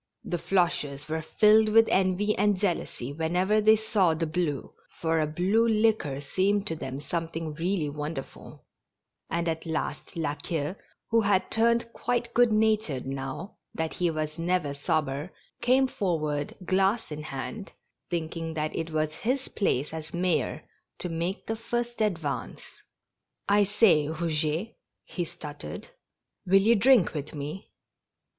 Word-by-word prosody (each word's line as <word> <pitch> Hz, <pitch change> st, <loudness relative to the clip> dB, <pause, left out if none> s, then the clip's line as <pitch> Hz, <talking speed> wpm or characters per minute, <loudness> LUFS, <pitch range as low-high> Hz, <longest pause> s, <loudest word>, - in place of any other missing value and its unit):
The 175 Hz, -4 st, -2 dB
Floches 155 Hz, -7 st, 0 dB
were 160 Hz, +1 st, -2 dB
filled 215 Hz, +6 st, +5 dB
with 225 Hz, +1 st, +6 dB
envy 190 Hz, +3 st, +2 dB
and 205 Hz, 0 st, +2 dB
jealousy 170 Hz, -8 st, -2 dB
whenever 180 Hz, +7 st, +1 dB
they 215 Hz, +1 st, +7 dB
saw 205 Hz, -6 st, +2 dB
the 165 Hz, +1 st, -1 dB
blue, 155 Hz, -3 st, -2 dB, 0.2 s
for 160 Hz, -1 st, -1 dB
a 155 Hz, -, +1 dB
blue 190 Hz, +9 st, +2 dB
liquor 215 Hz, -11 st, +2 dB
seemed 195 Hz, +8 st, +1 dB
to 165 Hz, -, -1 dB
them 135 Hz, -3 st, -5 dB
something 165 Hz, +1 st, -3 dB
really 165 Hz, 0 st, -1 dB
wonderful; 150 Hz, -1 st, -7 dB, 0.6 s
and 170 Hz, +1 st, -1 dB
at 160 Hz, 0 st, -2 dB
last 155 Hz, 0 st, -3 dB
La 150 Hz, -3 st, 0 dB
Queue, 150 Hz, +2 st, -3 dB, 0.4 s
who 230 Hz, 0 st, +5 dB
had 200 Hz, -2 st, +1 dB
turned 235 Hz, +1 st, +2 dB
quite 240 Hz, -1 st, -1 dB
good 245 Hz, -1 st, +5 dB
natured 215 Hz, -, +1 dB
now 135 Hz, +8 st, -5 dB, 0.2 s
that 160 Hz, 0 st, -2 dB
he 175 Hz, -1 st, +1 dB
was 155 Hz, 0 st, -3 dB
never 170 Hz, -4 st, 0 dB
sober, 145 Hz, +2 st, -1 dB, 0.3 s
came 260 Hz, +2 st, +4 dB
for 180 Hz, -9 st, -1 dB
ward, 150 Hz, -1 st, -2 dB
glass 195 Hz, +2 st, +1 dB
in 150 Hz, 0 st, -5 dB
hand, 155 Hz, +9 st, -6 dB, 0.4 s
thinking 165 Hz, -1 st, -3 dB
that 155 Hz, 0 st, -2 dB
it 165 Hz, 0 st, -2 dB
was 155 Hz, -1 st, -1 dB
his 255 Hz, -, -2 dB
place 150 Hz, -7 st, 0 dB
as 160 Hz, +1 st, -6 dB
mayor 180 Hz, -1 st, 0 dB, 0.3 s
to 180 Hz, -, -4 dB
make 170 Hz, +4 st, -3 dB
the 225 Hz, -, -2 dB
first 240 Hz, +1 st, -3 dB
advance. 165 Hz, -9 st, -2 dB, 0.5 s
" -, -, -58 dB, 0.3 s
I 205 Hz, 0 st, +5 dB
say, 195 Hz, -7 st, +4 dB
Eouget," 160 Hz, +4 st, -1 dB, 0.3 s
he 175 Hz, -, -3 dB
stuttered, 150 Hz, -, -8 dB, 0.3 s
" -, -, -56 dB
will 190 Hz, -, +4 dB
you 200 Hz, +4 st, +6 dB
drink 230 Hz, -4 st, +5 dB
with 150 Hz, 0 st, -5 dB
me? 150 Hz, +6 st, -6 dB
170 Hz, 150 wpm, -28 LUFS, 155-210 Hz, 0.6 s, they